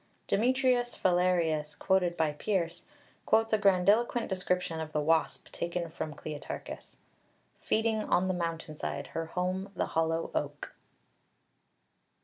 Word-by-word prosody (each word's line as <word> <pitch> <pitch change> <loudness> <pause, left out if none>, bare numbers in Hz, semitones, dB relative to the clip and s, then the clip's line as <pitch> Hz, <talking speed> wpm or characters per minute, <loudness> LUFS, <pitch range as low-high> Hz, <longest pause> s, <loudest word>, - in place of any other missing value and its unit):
Demetrius 250 +1 +2
Phalereus, 175 -4 +2
quoted 180 -2 +2
by 160 -2 +2
Pearce, 170 +1 -2 0.4
quotes 225 0 +3
a - - +6
grandiloquent 205 +5 +3
description 180 -3 -1
of 155 -1 -5
the 150 - +1
wasp 160 +2 +1
taken 170 -1 -3
from 155 -2 -5
Kleitarchus, 150 -2 -7 0.6
"feeding 220 -1 +1
on 185 +1 +2
the 185 - +1
mountainside, 165 -4 -3
her 165 0 -2
home 185 +3 -2
the - - 0
hollow 165 0 0
oak." 145 0 -3
180 Hz, 120 wpm, -30 LUFS, 160-200 Hz, 0.6 s, a